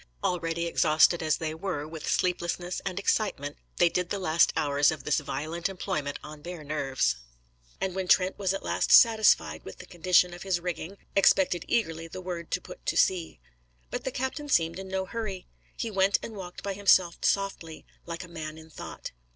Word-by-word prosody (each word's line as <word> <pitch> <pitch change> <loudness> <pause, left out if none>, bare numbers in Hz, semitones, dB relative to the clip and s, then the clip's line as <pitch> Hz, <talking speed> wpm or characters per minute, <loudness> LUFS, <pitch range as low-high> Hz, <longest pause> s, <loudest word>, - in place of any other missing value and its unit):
Already 170 -1 -1
exhausted 165 0 +4
as 155 -1 +1
they 155 -1 -3
were 160 -3 -4
with 160 -1 -6
sleeplessness 180 0 -1
and 190 -1 -4
excitement, 195 -8 0 0.2
they 175 - +5
did 180 +1 -1
the 205 - -1
last 170 -3 +3
hours 145 0 +3
of 155 - -3
this 150 - +2
violent 155 +5 -3
employment 150 -6 -3
on 150 0 -10
bare 175 0 -7
nerves; 135 - 0 0.6
and 190 - -1
when 190 0 -3
Trent 185 +1 +4
was 190 -2 +1
at 195 - -3
last - - 0
satisfied 220 - +6
with 95 - -9
the - - -10
condition 180 0 +3
of 175 - -10
his 190 -2 0
rigging, 175 +2 -5 0.2
expected 190 -3 +4
eagerly 165 -8 0
the 165 - -8
word 175 -2 -5
to - - 0
put - - -11
to - - 0
sea. 180 -3 +1 0.5
But - - -3
the 265 - -2
captain 265 +4 -3
seemed 165 -6 +2
in 190 - -7
no 190 0 -2
hurry. 205 -3 -5 0.3
He 230 - -3
went 195 0 +3
and 225 - -6
walked 180 -3 -8
by 200 - -2
himself 190 -3 +3
softly, 195 -5 -1 0.2
like 170 +2 -5
a - - -10
man 160 -2 -7
in 160 0 -13
thought. - - -8
175 Hz, 190 wpm, -28 LUFS, 160-190 Hz, 0.6 s, satisfied